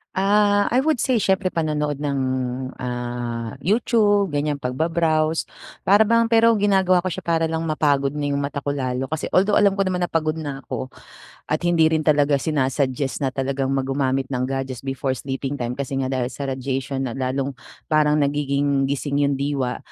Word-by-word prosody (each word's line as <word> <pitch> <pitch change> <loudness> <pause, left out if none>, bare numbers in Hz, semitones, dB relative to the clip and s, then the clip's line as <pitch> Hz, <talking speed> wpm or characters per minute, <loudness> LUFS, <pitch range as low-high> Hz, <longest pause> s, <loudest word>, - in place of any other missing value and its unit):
Ah, 205 +1 +3
I 255 +2 +2
would 310 -5 +1
say 260 - +1
siyempre 190 -1 +2
panonood 150 -3 -1
ng, 140 -2 -1 0.6
ah, 120 -2 -4
YouTube 205 -1 +3
ganyan, 145 -2 -1
pagba-browse 155 +4 0 0.4
para 205 +3 +6
bang, 230 +1 +3
pero 230 0 +5
ginagawa 190 -3 +3
ko 185 - -3
siya 175 - -4
para 165 -1 +1
lang 160 0 -2
mapagod 145 -3 +1
na 145 -1 -3
yung 140 0 -1
mata 140 0 -3
ko 145 0 -3
lalo, 130 -1 -2
kasi 155 +3 -4
although 200 +3 +3
alam 200 -1 +5
ko 195 0 0
naman 180 -1 -1
na 175 - -2
pagod 155 -1 0
na 145 -4 -5
ako 130 0 -5 0.6
at 155 +3 -1
hindi 170 -2 +3
rin 160 0 +2
talaga 145 -1 +3
sina-suggest 135 -1 -1
na 135 - +1
talagang 135 0 -2
mag 135 -1 0
gumamit 135 -1 0
ng 125 -2 -2
gadgets 135 -2 -4
before 135 0 -2
sleeping 135 +1 -4
time 125 -1 -4
kasi 140 0 -3
nga 135 -1 -1
dahil 130 -2 -1
sa 135 +2 -5
radiation 135 0 -3
na 120 - -4
lalong 135 +1 -2 0.3
parang 150 -1 +3
nagiging 140 -1 +1
gising 140 +1 -1
yung 140 -1 +1
diwa, 135 -3 -1
145 Hz, 180 wpm, -22 LUFS, 135-165 Hz, 0.6 s, para